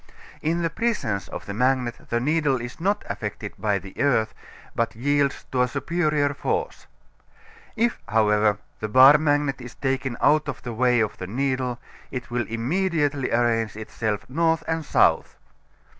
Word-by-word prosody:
In 170 +2 0
the 165 - 0
presence 150 - -1
of - - -7
the 100 - -5
magnet 125 +1 0
the 120 - +1
needle 145 0 +1
is 120 +1 -7
not 200 +4 0
affected 105 0 -5
by 105 0 +1
the 95 0 -8
earth, 125 -6 +2 0.4
but 115 -1 -1
yields 140 +3 0
to 125 - +1
a 125 - +3
superior 150 +1 0
force. 140 - -3 0.9
If, 235 0 +1
however, 105 -1 +3 0.2
the 110 - -3
bar 130 +6 +8
magnet 145 -3 +1
is 125 0 -10
taken 130 -2 -2
out 155 0 +3
of 130 - -6
the 120 - -5
way 125 0 +3
of 110 - -2
the 90 - -5
needle 130 +2 -1 0.3
it 125 -2 -6
will 120 -1 -1
immediately 145 +3 0
arrange 115 -2 +1
itself 110 -1 -3
north 165 +3 +1
and 160 0 -1
south. - - +2
130 Hz, 160 wpm, -24 LUFS, 115-150 Hz, 0.9 s, bar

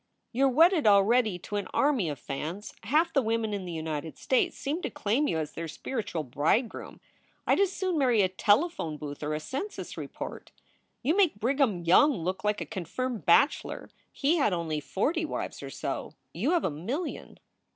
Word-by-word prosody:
You 265 +3 +3
re 260 - 0
wedded 330 - +5
already 210 0 +4
to 205 +3 -5
an 205 - -3
army 270 - +2
of 145 - -4
fans. 160 - -5
Half 315 - +2
the 275 - +4
women 225 -2 -1
in 200 -2 -3
the 175 - -5
United 160 -1 -4
States 260 - +1
seem 300 +5 -2
to - - -2
claim 240 +9 0
you 165 - 0
as 155 -1 -3
their 165 0 -5
spiritual 205 - -4
bridegroom. 150 - -1 0.5
I - - +4
d - - +3
as 395 -2 +3
soon 370 -4 -1
marry 245 -6 +4
a - - +4
telephone 205 - +1
booth 145 -1 -7
or 150 0 -1
a - - -2
census 275 - -5
report. - - -7 0.5
You 310 +7 +2
make 365 - +3
Brigharn 235 - +1
Young 285 - +6
look 185 +4 -3
like 210 0 0
a - - -2
confirmed 220 +5 -4
bachelor; 275 - +3 0.2
he 300 +5 +1
had 270 - +2
only 165 -3 -1
forty 280 - -1
wives 310 - -4
or - - -6
so. - - -5 0.2
You - - -1
have 345 - +2
a - - 0
million." 240 - -5
215 Hz, 190 wpm, -28 LUFS, 170-285 Hz, 0.5 s, Young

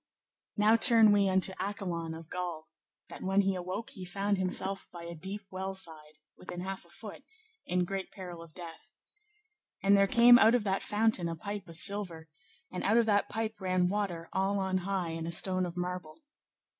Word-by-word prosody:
Now 215 +2 +5
turn 225 -3 +7
we 200 -1 +3
unto 190 0 +3
Accolon 175 -5 -4
of 165 -1 -11
Gaul, 175 -3 -5 0.4
that - - -10
when 195 +1 +2
he 195 0 +1
awoke 185 +5 -5
he 185 - -9
found 195 +2 -1
himself 190 +1 -1
by 170 -1 -9
a 170 0 -7
deep 195 +5 -7
well 190 +1 -4
side, 155 -5 -4 0.2
within 175 -1 -8
half 190 +1 -5
a - - -22
foot, - - -10 0.5
in 180 0 +1
great 195 +1 -4
peril 180 -3 -9
of 165 -2 -14
death. 170 -2 -10 0.9
And 200 +1 +5
there 200 0 +4
came 240 +3 +7
out 225 +2 +6
of 240 - +1
that 195 -1 0
fountain 210 -5 0
a 165 - -4
pipe 200 +2 -6
of 165 -1 -6
silver, 180 -5 0 0.4
and 180 - -5
out 220 +3 +3
of 235 - +4
that 205 -2 +2
pipe 220 -2 -4
ran 185 -1 +1
water 185 -5 -3
all 195 +1 0
on 190 -1 0
high 185 -2 -2
in 165 0 -5
a - - -3
stone 185 +1 +1
of 175 +1 -9
marble. 180 - -5
190 Hz, 195 wpm, -30 LUFS, 175-200 Hz, 0.9 s, turn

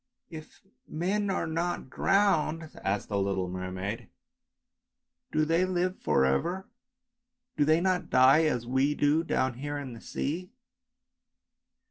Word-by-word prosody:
" - - -52
If 155 - -22 0.2
men 195 +5 -1
are 190 - 0
not 165 -3 -3
drowned," 165 -5 +1
asked 100 +1 -1
the 100 -1 0
little 95 -1 -1
mermaid, 95 +4 -5 0.6
" - - -57
do 155 0 +2
they 165 +3 +2
live 185 0 -1
for 65 - +2
ever, 175 - -1 0.9
do 145 - +2
they 155 +2 +3
not 180 -2 0
die 130 +5 +6
as 125 -6 0
we 135 +4 +1
do 150 +3 +2
down 130 -6 -1
here 145 +1 -4
in 135 -4 -6
the 115 - -11
sea 170 +6 -4
155 Hz, 140 wpm, -29 LUFS, 120-175 Hz, 0.9 s, die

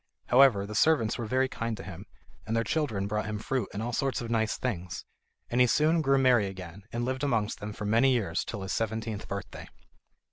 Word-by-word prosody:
However, 125 -5 +6
the 105 - -7
servants 115 -2 +3
were 115 - -3
very 130 +3 +2
kind 115 -3 -3
to - - -8
him, 95 +3 -9 0.4
and 115 +1 0
their 115 - +2
children 110 -6 -1
brought 105 +1 -2
him 110 -1 -3
fruit 120 0 -2
and 105 - -4
all 120 +1 -3
sorts 135 -1 0
of 115 -1 -5
nice 110 -2 +1
things, 90 -8 -4 0.4
and 120 +1 +1
he 125 - +6
soon 155 +6 +3
grew 135 -2 +3
merry 125 -6 +4
again, 95 -1 -8
and 120 +1 -2
lived 130 +2 -2
amongst 115 -7 0
them 105 +1 -5
for 105 0 -6
many 115 +6 +4
years 100 -9 0
till 100 -4 -6
his 95 - -3
seventeenth 110 -1 -3
birthday. 100 -1 -6
115 Hz, 215 wpm, -29 LUFS, 105-130 Hz, 0.4 s, However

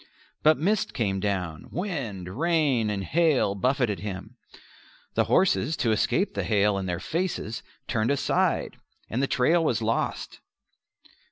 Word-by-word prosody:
But 155 0 +5
mist 205 +5 0
came 100 -5 0
down; 95 -6 -3
wind, 135 - -4
rain, 155 -9 +2
and 100 -2 -2
hail 150 - +2
buffeted 125 0 0
him; 105 +3 -6 0.8
the - - +2
horses, 165 -4 +2
to 115 - +1
escape 190 - +1
the - - -2
hail 105 -2 +2
in 95 - -4
their 90 -1 -2
faces, 165 - -3 0.3
turned 115 -1 0
aside, 140 -1 +1 0.3
and 120 - 0
the 140 - +1
trail 165 +8 +3
was 120 -7 +1
lost. 115 0 -2
120 Hz, 140 wpm, -26 LUFS, 100-160 Hz, 0.8 s, But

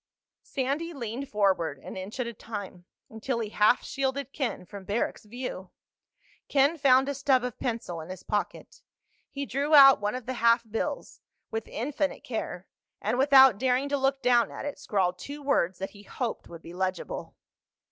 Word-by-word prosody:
Sandy 285 +5 -2
leaned 255 0 -5
forward, 190 -8 +1
an 135 - -10
inch 190 +6 -7
at 250 - 0
a 235 - -5
time, 200 -5 -8 0.3
until 225 +3 -3
he 220 -2 -3
half 215 +3 +3
shielded 270 0 -2
Ken 250 -10 -3
from 200 +2 -10
Barrack's 210 +3 -2
view. 210 -5 -6 0.8
Ken 280 +3 +3
found 265 -1 +5
a 285 - -1
stub 270 -2 +2
of 250 -2 -5
pencil 225 -9 -3
in 160 - -10
his 185 -1 -8
pocket. 205 -1 -4 0.5
He 280 0 -4
drew 280 +4 +1
out 275 -5 +9
one 210 +3 -1
of 255 -2 -6
the 260 - -3
half 230 0 +5
bills, 220 +1 -4 0.3
with 225 0 -3
infinite 285 +4 -2
care, 195 -6 -5 0.3
and 245 - -1
without 265 -5 +7
daring 260 +2 +1
to 285 - +1
look 270 0 0
down 240 -1 +4
at - - -7
it 290 - -5
scrawled 185 -7 0
two 285 +7 -8
words 190 -10 +1
that 195 - -5
he 205 - -14
hoped 230 +3 -4
would 165 -1 -11
be 170 - -10
legible. 185 - -4
240 Hz, 175 wpm, -28 LUFS, 205-275 Hz, 0.8 s, out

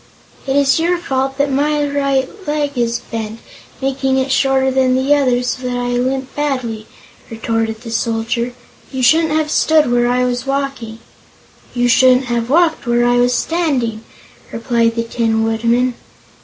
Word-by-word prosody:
"It 270 - 0
is 280 +1 +3
your 345 +2 +1
fault 270 -4 -2
that 285 0 +1
my 295 +2 +1
right 275 -2 0 0.2
leg 295 -1 -1
is 235 -1 -1
bent, 225 -1 -5 0.4
making 270 0 0
it 265 0 0
shorter 265 0 +2
than 260 -1 +2
the 265 +3 +2
other, 255 -4 +2
so 250 +1 -3
that 245 0 -2
I 245 0 -2
limp 260 +2 -2
badly," 255 -7 -3 0.4
retorted 225 -1 -2
the 230 -2 -8
Soldier. 230 +2 -2 0.4
"You 260 -2 -3
shouldn't 320 +4 +4
have 310 -1 0
stood 310 -5 +3
where 240 0 +2
I 250 +1 +1
was 245 +1 -2
walking." 275 -5 -3 0.8
"You 245 0 +2
shouldn't 255 +1 +4
have 235 -1 -2
walked 320 -2 +2
where 240 0 +2
I 245 0 +3
was 245 0 +2
standing," 260 -10 -1 0.5
replied 230 -1 0
the 230 - -1
Tin 225 -1 0
Woodman. 235 +3 +1
255 Hz, 160 wpm, -17 LUFS, 235-275 Hz, 0.8 s, shouldn't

